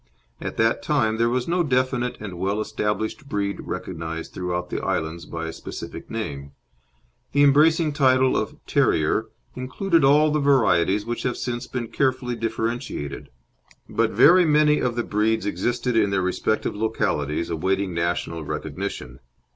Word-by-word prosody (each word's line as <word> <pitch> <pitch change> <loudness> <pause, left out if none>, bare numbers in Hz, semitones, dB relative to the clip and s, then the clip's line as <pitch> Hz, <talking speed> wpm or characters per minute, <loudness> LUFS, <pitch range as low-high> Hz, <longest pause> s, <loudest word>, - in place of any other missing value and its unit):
At - - -5
that - - +2
time 110 0 +1
there 115 +1 +2
was 125 0 -1
no 175 +1 +1
definite 130 -4 0
and 95 -5 -7
well 100 +3 0
established 110 +6 -3
breed 100 -1 -2
recognised 80 0 -5
throughout 90 -1 -3
the - - -2
islands 80 +2 -2
by 80 0 -5
a 80 - -5
specific - - -8
name; 70 -11 -5 0.8
the 145 +1 +4
embracing 150 +2 +4
title 130 -2 +3
of - - -2
"Terrier" - - +2 0.3
included 160 +6 0
all 150 +3 +5
the 150 - +1
varieties 105 - +3
which 120 0 -3
have 125 - -2
since 120 -1 -4
been 120 -3 -4
carefully 130 -2 0
differentiated. 115 - -3 0.6
But - - +1
very 180 +4 +6
many 150 -1 +4
of 120 -2 -1
the 120 - 0
breeds 110 0 0
existed 120 +5 -1
in 105 -3 +3
their 95 -1 0
respective 100 +4 -1
localities 85 -8 -1
awaiting 95 +3 0
national 85 -1 -2
recognition. 65 -3 -5
115 Hz, 145 wpm, -24 LUFS, 90-130 Hz, 0.8 s, very